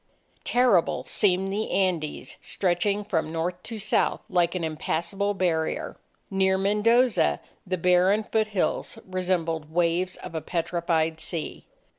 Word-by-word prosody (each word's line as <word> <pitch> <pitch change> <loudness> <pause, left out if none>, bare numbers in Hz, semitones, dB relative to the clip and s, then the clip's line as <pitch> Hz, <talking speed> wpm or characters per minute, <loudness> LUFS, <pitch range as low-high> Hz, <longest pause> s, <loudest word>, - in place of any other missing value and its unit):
Terrible 240 -9 +3
seemed 195 -1 +1
the 215 +2 -2
Andes 175 -6 -1
stretching 200 +3 0
from 165 -6 -1
North 175 +2 -2
to 225 +3 -6
South 215 0 +1
like 175 -1 +2
an 180 - -2
impassable 175 +6 -2
barrier. 165 -4 -1 0.4
Near 190 0 +2
Mendoza, 210 - +3 0.3
the 185 0 -1
barren 180 +4 +3
foothills 215 -3 -1
resembled 175 -4 -1
waves 175 +2 +1
of - - -9
a 160 - -3
petrified 165 -1 -1
sea. 165 -2 -5
180 Hz, 120 wpm, -26 LUFS, 165-200 Hz, 0.4 s, Terrible